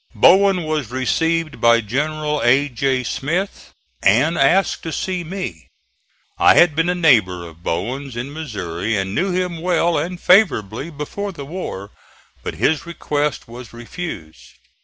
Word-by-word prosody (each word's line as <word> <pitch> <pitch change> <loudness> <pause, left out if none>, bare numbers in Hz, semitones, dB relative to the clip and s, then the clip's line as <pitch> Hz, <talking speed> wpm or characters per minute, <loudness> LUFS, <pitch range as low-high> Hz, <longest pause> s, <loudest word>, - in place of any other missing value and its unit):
Bowen 195 -1 +5
was 155 -6 -2
received 165 +6 -1
by 115 0 +5
General 150 +6 -2
A. 130 +4 +4
J. 130 +1 0
Smith, 170 - -3 0.3
and 130 +11 +3
asked 175 +6 +2
to 165 - -5
see 180 +3 -3
me. 165 - -6 0.7
I - - +6
had 175 -4 +5
been 165 +2 +1
a 180 - +1
neighbor 105 - +3
of 85 0 -15
Bowen's 120 +10 -4
in 130 +4 -5
Missouri, 105 - -3
and 95 0 -2
knew 185 - 0
him 180 -2 -2
well 175 -1 +1
and 180 +1 -4
favorably 160 - +2
before 170 +7 -5
the 145 -6 -9
war; 135 - -6 0.5
but - - -5
his 160 +1 0
request 150 -4 -2
was 120 0 -11
refused. 120 - -8
145 Hz, 145 wpm, -20 LUFS, 115-170 Hz, 0.7 s, I